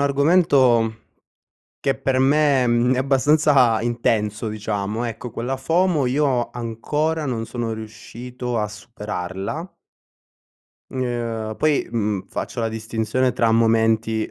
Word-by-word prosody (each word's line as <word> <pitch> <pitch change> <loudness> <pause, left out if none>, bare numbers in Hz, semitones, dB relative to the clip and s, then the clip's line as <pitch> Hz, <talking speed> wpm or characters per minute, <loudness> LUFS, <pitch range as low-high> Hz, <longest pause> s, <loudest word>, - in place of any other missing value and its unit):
argomento 140 -6 +3 0.9
che 135 - 0
per 130 -1 0
me, 140 -1 +3
mhmm, 120 +2 +2
è - - -2
abbastanza 135 -3 +3
intenso, 110 -2 -1
diciamo. 105 +1 -3
Ecco, 115 0 -6
quella 125 +4 -3
FOMO 160 +2 +1
io 130 -2 +1
ancora 145 +7 -2
non 115 -4 -2
sono 120 -1 -4
riuscito 120 +3 -6
a 105 - -1
superarla 105 - -6 1.2
n 130 - -4
uhm, 115 -3 -3
poi, 155 -2 +1
mhmm, 105 -4 -1
faccio - - -4
la 115 - 0
distinzione 110 +3 -1
tra 115 -1 +2
momenti, 110 -1 +2
120 Hz, 115 wpm, -22 LUFS, 110-135 Hz, 1.2 s, argomento